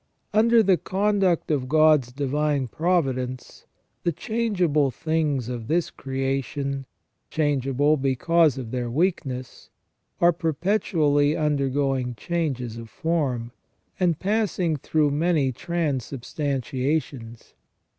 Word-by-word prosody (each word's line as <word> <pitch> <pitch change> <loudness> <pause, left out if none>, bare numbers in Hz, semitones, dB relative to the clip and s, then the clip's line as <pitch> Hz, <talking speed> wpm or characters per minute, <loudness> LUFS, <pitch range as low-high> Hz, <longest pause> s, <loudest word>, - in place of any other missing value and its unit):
Under 225 +2 +5
the 190 -3 +4
conduct 195 -4 +1
of 130 -4 -1
God's 155 -5 +4
divine 145 0 0
providence 130 - -2 0.3
the 170 - +1
changeable 180 - 0
things 150 -2 -1
of 120 -3 -5
this 170 +2 0
creation, 135 0 -3 0.4
changeable 145 0 +1
because 140 +2 +2
of 120 -4 -6
their 125 -2 -2
weakness, 130 -4 -2 0.5
are 175 0 +5
perpetually 160 -3 +1
undergoing 135 -4 0
changes 130 -5 -3
of 115 -1 -9
form, 145 - -1 0.5
and 175 -4 +2
passing 195 -5 0
through 150 +1 +1
many 150 -2 +1
transubstantiations. 135 -4 -3
145 Hz, 95 wpm, -24 LUFS, 130-170 Hz, 0.5 s, Under